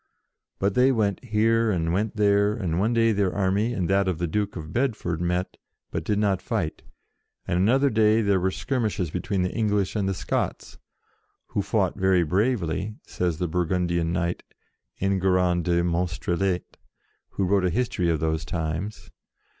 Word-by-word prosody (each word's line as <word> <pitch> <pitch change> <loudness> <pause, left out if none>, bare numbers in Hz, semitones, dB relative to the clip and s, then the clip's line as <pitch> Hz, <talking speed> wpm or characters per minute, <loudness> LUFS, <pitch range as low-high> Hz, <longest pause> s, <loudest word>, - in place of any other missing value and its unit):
But 100 0 0
they 125 +4 +4
went 105 -4 0
here 115 0 +2
and 85 -4 0
went 105 +4 -1
there, 100 0 +3
and 90 -7 -2
one 105 +4 +2
day 115 -1 +3
their 100 -3 +1
army 100 +4 +1
and 95 -7 -1
that 100 0 +2
of 90 -3 0
the 85 - -1
Duke 105 +4 -2
of 80 -2 -7
Bedford 110 -10 -1
met, 90 +1 -1 0.3
but 80 - -3
did 105 +5 0
not 100 -3 +1
fight; 80 -4 -2 0.7
and 85 - +1
another 130 +8 +3
day 110 0 +3
there 100 -2 +2
were 95 +1 +1
skir 130 +6 -2
mishes 95 -7 -1
between 90 +1 -1
the 90 - -2
English 105 -3 0
and 100 -2 0
the 95 - -1
Scots, - - -3 0.7
"who 100 - -1
fought 100 -2 0
very 95 -2 +3
bravely," 95 +1 0
says 90 -3 -2
the 90 - -1
Bur 90 +1 -1
gundian 85 -1 0
knight, 85 +1 -1 0.6
Enguerrand 90 -2 +1
de 85 -1 +2
Monstrelet, 90 +1 -1 0.6
who 95 - 0
wrote 95 +1 +2
a 90 - +2
history 100 -4 0
of 80 -2 +1
those 80 0 -1
times. 85 +5 -4
95 Hz, 170 wpm, -25 LUFS, 85-105 Hz, 0.7 s, they